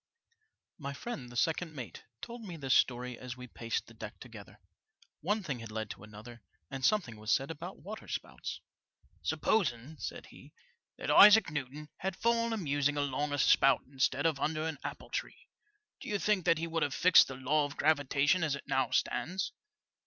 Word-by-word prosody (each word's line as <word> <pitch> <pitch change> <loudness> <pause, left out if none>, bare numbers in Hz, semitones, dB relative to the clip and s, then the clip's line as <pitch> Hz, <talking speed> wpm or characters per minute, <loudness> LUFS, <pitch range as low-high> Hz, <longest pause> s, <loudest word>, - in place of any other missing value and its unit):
My 140 -2 -5
friend, 140 - -6
the 120 - -7
second 160 +2 0
mate, 125 -5 -8 0.2
told 235 0 -7
me 180 -5 -7
this 135 -4 0
story 125 -1 +1
as 125 -1 -7
we 125 - -8
paced 115 -2 -3
the 115 - -15
deck 110 -2 -9
together. 110 -5 -12 0.6
One 205 +5 -1
thing 140 -9 -4
had 115 -1 -8
led 110 -1 -4
to - - -10
another, 110 +3 -11 0.3
and 135 -1 -5
something 145 - +1
was 110 +1 -2
said 135 +4 +2
about 175 +4 -8
waterspouts. 215 +3 -6 0.6
Supposing," 150 - 0
said - - -6
he, - - -16 0.4
that - - -2
Isaac 210 -4 +8
Newton 145 +1 -5
had 190 -1 -3
fallen 230 +1 +1
a 225 - -1
musing 145 -4 0
alongside 145 +1 -1
a - - -3
spout 135 -1 +4
instead 135 +1 +1
of 160 -4 +2
under 155 +1 -1
an 160 -3 -4
apple - - -7
tree; - - -5 0.3
— 420 0 -48
do - - -7
you 205 - +1
think 205 -3 +1
he 165 - -2
would 165 0 -2
have 145 -2 0
fixed 185 -1 +7
the 135 - -6
law 145 +3 +1
of 145 - -8
gravitation 145 +2 +2
as 150 -3 +1
it 140 - -9
now 135 -1 +1
stands 185 +4 -1
145 Hz, 185 wpm, -32 LUFS, 125-175 Hz, 0.6 s, Isaac